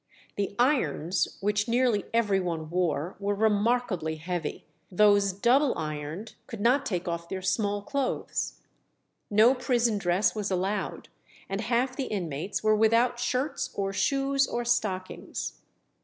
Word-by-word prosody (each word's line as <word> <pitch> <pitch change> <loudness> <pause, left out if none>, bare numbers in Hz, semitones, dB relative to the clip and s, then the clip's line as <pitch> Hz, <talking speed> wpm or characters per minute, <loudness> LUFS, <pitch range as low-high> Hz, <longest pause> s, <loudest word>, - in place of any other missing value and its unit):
The 200 0 -2
irons, 185 - +1
which 205 +2 +1
nearly 235 -3 +2
every 210 -4 +2
one 165 -3 -3
wore, 175 -1 0
were 205 0 -1
remarkably 210 -5 +1
heavy; 165 0 -4 0.3
those 205 +1 +4
double 245 +8 +3
ironed 155 +7 -5
could 230 - -7
not 250 +6 +3
take 180 -2 -2
off 170 0 -3
their 190 -1 -4
small 205 +1 0
clothes. 280 +1 -2 0.8
No 220 +5 +6
prison 240 -4 +1
dress 180 +2 +2
was 210 -2 -3
allowed, 190 +2 -2 0.4
and 195 +2 -3
half 245 +3 0
the 270 - -2
inmates 175 -2 -3
were 215 0 +4
without 230 +3 +3
shirts 260 +3 -1
or 195 -1 -1
shoes 275 +4 +1
or 240 0 -3
stockings. 185 - -2
205 Hz, 135 wpm, -28 LUFS, 185-240 Hz, 0.8 s, No